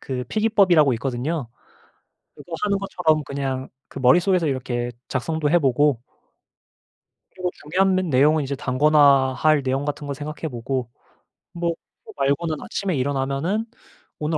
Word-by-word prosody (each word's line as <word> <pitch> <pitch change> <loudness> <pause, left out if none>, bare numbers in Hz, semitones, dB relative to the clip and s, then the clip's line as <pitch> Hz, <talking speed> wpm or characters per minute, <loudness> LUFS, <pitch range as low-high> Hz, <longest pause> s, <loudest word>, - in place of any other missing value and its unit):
그 125 -2 -4
필기법이라고 195 -10 +3
있거든요. 130 +3 -3 0.9
그거 175 - -12
하는 200 -1 +1
것처럼 165 -6 0
그냥 135 -1 -4 0.2
그 - - -8
머릿속에서 175 +6 +3
이렇게 120 -2 -2 0.2
작성도 150 +3 -1
해 175 +2 +4
보고 140 -2 +2 1.3
그리고 180 -1 -3
중요한 185 +5 +1
메 185 - +2
내용은 150 0 +3
이제 140 +1 -3
단권화할 140 +1 +3
내용 135 +2 -1
같은 145 0 -4
거 140 - -3
생각해 150 +2 -6
보고 125 0 -3 0.6
뭐 170 -1 -1 0.3
그거 - - -12
말고는 145 +4 0
아침에 190 -5 -3
일어나면은 140 - -1 0.5
오늘 155 +1 -1
145 Hz, 320 characters per minute, -22 LUFS, 135-170 Hz, 1.3 s, 해